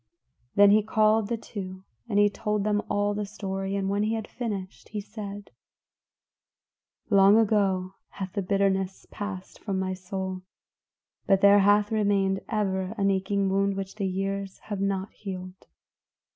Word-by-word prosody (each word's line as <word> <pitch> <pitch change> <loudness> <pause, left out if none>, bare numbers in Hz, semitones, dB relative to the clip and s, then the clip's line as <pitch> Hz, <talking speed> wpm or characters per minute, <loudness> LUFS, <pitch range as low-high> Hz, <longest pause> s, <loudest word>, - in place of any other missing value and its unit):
Then 200 0 +7
he 215 +1 +6
called 215 0 +3
the 235 +1 -1
two, 190 -4 -7 0.3
and 205 - 0
he 205 0 +6
told 210 0 -1
them 210 0 +1
all 205 0 +1
the 210 0 -2
story, 195 -1 -4
and 195 -1 -1
when 200 +1 0
he 215 +2 +1
had 220 -1 -4
finished, 200 -6 -5
he 215 - -4
said, 205 -1 -8 1.6
"Long 200 +1 +7
ago 195 -4 +2 0.2
hath 190 -2 -6
the 200 - -1
bitterness 195 0 0
passed 200 -3 -6
from 195 -3 -3
my 190 0 -1
soul; 185 0 -5 0.9
but 195 -1 +4
there 200 0 +7
hath 205 +1 +4
remained 200 -3 +1
ever 195 -2 -1
an 200 -1 +2
aching 195 +1 0
wound 195 +1 +1
which 195 -1 -5
the 200 -3 -2
years 195 +1 -3 0.2
have 195 - -3
not 195 0 -1
healed. 185 -2 -8
200 Hz, 155 wpm, -27 LUFS, 190-205 Hz, 1.6 s, Then